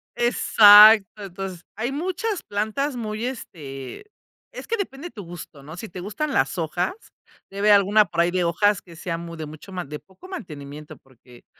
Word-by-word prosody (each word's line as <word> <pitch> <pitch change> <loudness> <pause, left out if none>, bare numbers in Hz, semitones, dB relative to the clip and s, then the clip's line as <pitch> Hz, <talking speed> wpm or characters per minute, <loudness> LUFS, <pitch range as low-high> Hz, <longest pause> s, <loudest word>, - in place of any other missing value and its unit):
Exacto. 210 -3 +6
Entonces, 190 -2 -7
hay 230 +5 -3
muchas 370 +7 -3
plantas 220 +8 -2
muy 220 -1 -4
este, 140 - -8 0.5
es - - -9
que 460 - 0
depende 350 -5 -5
tu 205 - -9
gusto, 165 -5 -11
¿no? 160 +4 -10
Si 225 - -7
te 180 -1 -9
gustan 275 +10 -4
las - - 0
hojas, 175 - -2 0.6
debe 200 +2 0
haber - - +8
alguna 205 +2 +3
por 170 - -6
ahí 170 +1 +1
de 180 0 0
hojas 195 +4 +1
que 170 -2 -15
sea 165 0 -4
muy 170 0 -8
de 160 - -5
mucho 155 +5 -12
más, 180 -4 -5
de 150 +1 -7
poco 195 - -17
mantenimiento, 150 - -9
porque, 125 -2 -20
195 Hz, 180 wpm, -23 LUFS, 165-225 Hz, 0.6 s, haber